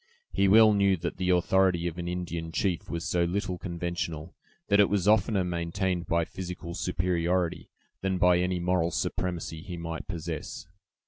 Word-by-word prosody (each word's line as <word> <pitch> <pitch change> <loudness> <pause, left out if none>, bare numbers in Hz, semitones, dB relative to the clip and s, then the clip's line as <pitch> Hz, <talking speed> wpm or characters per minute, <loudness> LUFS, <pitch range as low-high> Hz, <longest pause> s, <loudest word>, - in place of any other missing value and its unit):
He 100 - +2
well 110 +2 +7
knew 100 -2 +3
that 85 +1 -4
the 90 0 -1
authority 90 0 +3
of 85 0 -3
an 85 - -4
Indian 85 -2 -4
chief 90 0 -1
was 85 0 -3
so 85 -1 +1
little 90 +1 -2
conventional, 85 -2 -4 0.3
that 100 0 +4
it 100 - +6
was 100 -2 0
oftener 105 -2 +3
maintained 90 +1 -2
by 85 0 +1
physical 90 -2 -7
superiority 90 -1 -1 0.3
than 95 -1 0
by 90 -1 +4
any 90 0 0
moral 90 -1 +1
supremacy 85 -1 -3
he 90 0 -7
might 85 -1 -5
possess. 85 -3 -5
90 Hz, 165 wpm, -28 LUFS, 85-95 Hz, 0.3 s, well